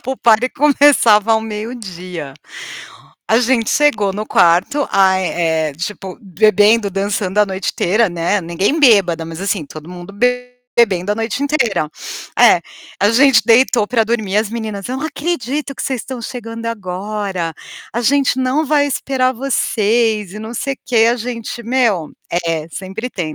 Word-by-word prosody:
A - - -31
pool 265 +1 -4
party 235 +1 +3
começava 265 -7 +4
ao 220 - +2
meio-dia. 190 - -7 0.9
A 225 - +4
gente 240 -2 +1
chegou 220 -10 +2
no 210 +2 -5
quarto, 180 +14 +2
ai 190 -1 +3
eh, 160 -3 0
tipo, 190 - -6
bebendo, 210 +1 +3
dançando 195 0 -2
a 210 - +5
noite 190 0 -3
inteira, 215 +5 +1
né. 175 +3 -1
Ninguém 190 - -1
bêbada, 195 - +4
mas 165 +2 -8
assim, 195 -4 -2
todo 155 +2 -11
mundo 180 +2 -10
bebendo 245 -4 0
a - - -2
noite 225 +5 -3
inteira. 240 - 0 0.5
É, - - +6 0.4
a 205 - +4
gente 250 -1 +5
deitou 230 -1 +4
para 225 0 +1
dormir 215 -3 -1
as 215 0 +1
meninas: 220 -3 -5
"Eu 255 - -3
não 310 - -3
acredito 290 -3 -3
que - - -6
vocês 260 -3 -2
estão 260 +1 -7
chegando 230 -1 -7
agora. 195 -4 -4 0.4
A 235 - -2
gente 270 +2 +2
não 260 +4 +1
vai 290 0 +2
esperar 260 -2 0
vocês 225 -5 0
e 210 - -8
não 220 +2 -7
sei 275 +3 -3
quê". 230 -2 +3
A - - -2
gente: 240 0 -6
"Meu" 230 - 0 0.4
é, 160 -1 -2
sempre 195 +8 -6
tem, 160 -7 -4
220 Hz, 160 wpm, -17 LUFS, 190-250 Hz, 0.9 s, É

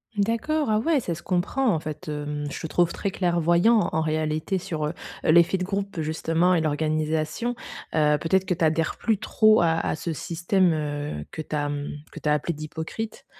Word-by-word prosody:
D'accord. 230 +6 0
Ah 215 - +3
ouais, 300 +4 +2
ça 170 - -2
se 170 - -10
comprend 190 +10 0
en 155 - -1
fait, 155 0 -7
hem, 150 0 -3
je - - -6
te - - -5
trouve 175 +1 +2
très 200 - -2
clairvoyant 175 +5 +3
en 160 - +1
réalité 155 +3 -1
sur, 160 -4 -3
heu 160 - -3 0.3
heu, - - +2
l'effet 170 +3 +5
de - - -1
groupe 195 -2 -3
justement 165 +3 +1
et 165 - +2
l'organisation. 155 +8 -1 0.4
Heu, 150 -1 +3
peut-être 190 +3 +1
que 180 - +1
tu 165 - +1
adhères 160 +1 +1
plus 220 -3 0
trop 215 -1 +4
à 165 -1 +3
à - - -1
ce 165 0 -4
système, 170 +3 +1
heu, 145 - -3
que 160 - -5
tu 150 - -5
as, 145 -1 0
mmh, 145 0 -3 0.2
que - - -9
tu 150 - -1
as - - +4
appelé 150 +3 -1
d'hypocrite. 160 +8 -6
165 Hz, 205 wpm, -25 LUFS, 155-190 Hz, 0.4 s, l'effet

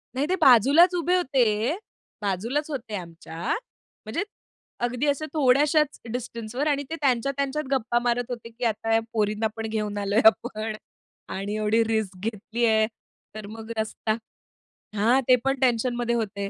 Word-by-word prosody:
नाही 270 +3 +1
ते 370 - +3
बाजूलाच 280 - +7
उभे 350 +1 +1
होते, 270 -7 +2 0.8
बाजूलाच 225 - -1
होते 240 -6 -4
आमच्या, 170 -2 -8 0.6
म्हणजे - - -2 0.6
अगदी 250 +3 -1
अशा 285 +2 0
थोड्याशाच 295 +1 +3
डिस्टन्सवर 240 +2 -4
आणि 285 -1 +1
ते 325 - -3
त्यांच्या-त्यांच्यात 275 +3 0
गप्पा 240 -2 +1
मारत 245 0 +1
होते 235 -2 -6
की, 235 +2 -10
"आता 225 0 -1
ह्या 225 - +5
पोरींना 215 0 +1
पण 225 0 -4
घेऊन 210 -2 -2
आलोय 200 +2 +1
आपण 220 -1 +3 0.6
आणि 200 +2 -3
एवढी 215 +1 +2
रिस्क 220 -4 -1
घेतली 225 +2 -2
आहे. 220 -1 +3 0.5
तर 215 -1 -6
मग 225 +1 -8
रस्ता" 220 0 -1 0.8
हां, 235 +6 +3
ते 255 - +7
पण 270 0 0
टेन्शनमध्ये 240 -1 +1
होते. 200 -3 -2
235 Hz, 145 wpm, -25 LUFS, 215-270 Hz, 0.8 s, बाजूलाच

